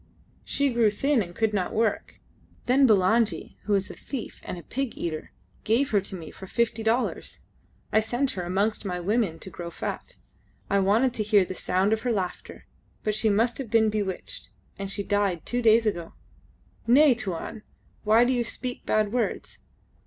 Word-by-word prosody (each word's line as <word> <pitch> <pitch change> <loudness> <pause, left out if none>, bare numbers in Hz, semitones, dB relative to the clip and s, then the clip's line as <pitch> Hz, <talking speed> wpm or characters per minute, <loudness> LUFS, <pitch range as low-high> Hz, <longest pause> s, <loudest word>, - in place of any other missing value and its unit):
"She 280 -2 0
grew 230 -2 +4
thin 270 +5 +1
and 175 -3 -6
could 220 -1 +1
not 185 -3 -1
work. 220 -1 -1 0.5
Then 265 +2 +5
Bulangi, 220 +2 +2
who 210 - +2
is 195 0 -1
a - - -8
thief 265 -6 -7
and - - -5
a 170 - -9
pig 265 - -4
eater, 155 -2 -4 0.3
gave 245 +6 +2
her 205 -2 +3
to 190 - -7
me 165 -4 -8
for 190 - -11
fifty 235 +1 0
dollars. 225 +3 -1 0.5
I 220 - +6
sent 240 +5 0
her 185 - -4
amongst 195 +6 0
my 180 -3 -3
women 200 -2 0
to 190 - -11
grow 170 0 -6
fat. - - -6 0.6
I 200 - +4
wanted 220 +6 +3
to 225 - -2
hear 205 -2 +4
the 185 - -5
sound 185 +3 +1
of 220 - -1
her 250 - 0
laughter, 185 -5 -4 0.4
but 215 - 0
she 215 +1 +2
must 230 +5 +1
have 260 -5 -5
been 220 -1 +3
bewitched, 200 -3 -3 0.3
and... 195 0 -4
she 200 +1 -3
died 200 -4 0
two 245 0 -1
days 225 0 +5
ago. 175 -6 -2 0.7
Nay, 275 +3 +7
Tuan. 215 -1 -5 0.4
Why 220 +3 +5
do 255 - +2
you 245 -1 +1
speak 245 +2 -5
bad 215 0 +1
words? 245 -2 -2
215 Hz, 185 wpm, -26 LUFS, 195-235 Hz, 0.7 s, Nay